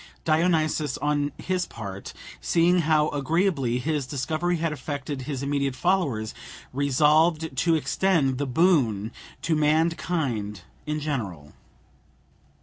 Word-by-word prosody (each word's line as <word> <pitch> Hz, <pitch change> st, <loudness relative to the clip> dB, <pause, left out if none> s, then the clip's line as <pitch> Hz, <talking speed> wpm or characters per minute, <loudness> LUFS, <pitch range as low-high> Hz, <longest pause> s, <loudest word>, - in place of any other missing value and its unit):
Dionysus, 155 Hz, -3 st, +1 dB
on 145 Hz, 0 st, 0 dB
his 185 Hz, -1 st, -2 dB
part, 100 Hz, -4 st, -7 dB, 0.3 s
seeing 175 Hz, +1 st, +3 dB
how 155 Hz, -2 st, +3 dB
agreeably 145 Hz, -3 st, 0 dB
his 145 Hz, 0 st, -2 dB
discovery 155 Hz, +6 st, -1 dB
had 165 Hz, -1 st, -1 dB
affected 145 Hz, 0 st, -5 dB
his 135 Hz, 0 st, -4 dB
immediate 140 Hz, -2 st, -1 dB
followers, 140 Hz, -, 0 dB, 0.4 s
resolved 150 Hz, +3 st, +2 dB
to 165 Hz, +5 st, +3 dB
extend 155 Hz, -5 st, +1 dB
the 145 Hz, -, -1 dB
boon 125 Hz, -, +2 dB, 0.3 s
to 160 Hz, -, +1 dB
mankind 150 Hz, -, 0 dB, 0.3 s
in 150 Hz, 0 st, -1 dB
general. 100 Hz, -, -4 dB
150 Hz, 110 wpm, -25 LUFS, 130-165 Hz, 0.4 s, seeing